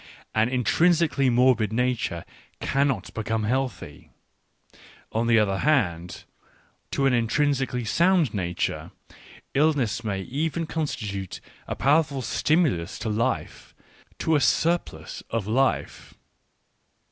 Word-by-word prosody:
An 110 Hz, +2 st, +2 dB
intrinsically 150 Hz, +2 st, +2 dB
morbid 120 Hz, -3 st, +3 dB
nature 120 Hz, -8 st, -1 dB, 0.3 s
cannot 135 Hz, -7 st, 0 dB
become 110 Hz, 0 st, -2 dB
healthy. 130 Hz, +2 st, -3 dB, 1.0 s
On 115 Hz, +1 st, 0 dB
the 115 Hz, -1 st, +5 dB
other 100 Hz, -3 st, +2 dB
hand, 90 Hz, -, 0 dB, 0.7 s
to 135 Hz, -, 0 dB
an 135 Hz, -, +3 dB
intrinsically 125 Hz, +1 st, 0 dB
sound 170 Hz, -, +3 dB
nature, 90 Hz, -4 st, -2 dB, 0.6 s
illness 135 Hz, -7 st, +1 dB
may 100 Hz, -3 st, -2 dB
even 160 Hz, -, -2 dB
con 160 Hz, 0 st, -2 dB
stitute 100 Hz, -8 st, -5 dB, 0.3 s
a -, -, -3 dB
powerful 140 Hz, -1 st, +2 dB
stimulus 125 Hz, -, +1 dB
to 115 Hz, -, -4 dB
life, 110 Hz, +2 st, -2 dB, 0.4 s
to 160 Hz, -, +1 dB
a 145 Hz, -, +3 dB
surplus 130 Hz, -, 0 dB
of 115 Hz, -3 st, -2 dB
life. 130 Hz, +5 st, -1 dB
125 Hz, 110 wpm, -25 LUFS, 110-145 Hz, 1.0 s, the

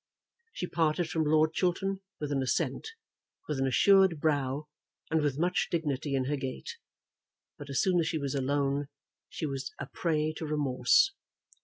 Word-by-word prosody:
She 180 Hz, -, -4 dB
parted 165 Hz, -1 st, 0 dB
from 160 Hz, -1 st, +1 dB
Lord 155 Hz, +1 st, +3 dB
Chiltern 190 Hz, +2 st, 0 dB, 0.2 s
with 150 Hz, -1 st, -3 dB
an 135 Hz, -1 st, +1 dB
assent, 130 Hz, -, -1 dB, 0.6 s
with 150 Hz, -3 st, -2 dB
an 135 Hz, -, +1 dB
assured 190 Hz, +4 st, +5 dB
brow, 145 Hz, -1 st, 0 dB, 0.5 s
and 160 Hz, -1 st, +3 dB
with 145 Hz, -2 st, 0 dB
much 180 Hz, +3 st, +1 dB
dignity 145 Hz, -4 st, -1 dB
in 130 Hz, -1 st, 0 dB
her 145 Hz, +2 st, -1 dB
gait; 130 Hz, -, -5 dB, 0.8 s
but 145 Hz, -1 st, -9 dB
as 140 Hz, -, +1 dB
soon 185 Hz, -2 st, +3 dB
as 160 Hz, -, +1 dB
she 165 Hz, -, -1 dB
was 140 Hz, -3 st, -3 dB
alone 140 Hz, +1 st, 0 dB, 0.4 s
she -, -, -4 dB
was 135 Hz, -2 st, -4 dB
a 145 Hz, -, -5 dB
prey 155 Hz, +1 st, -1 dB
to 160 Hz, -, -4 dB
remorse. 145 Hz, -, +3 dB
150 Hz, 165 wpm, -30 LUFS, 140-165 Hz, 0.8 s, assured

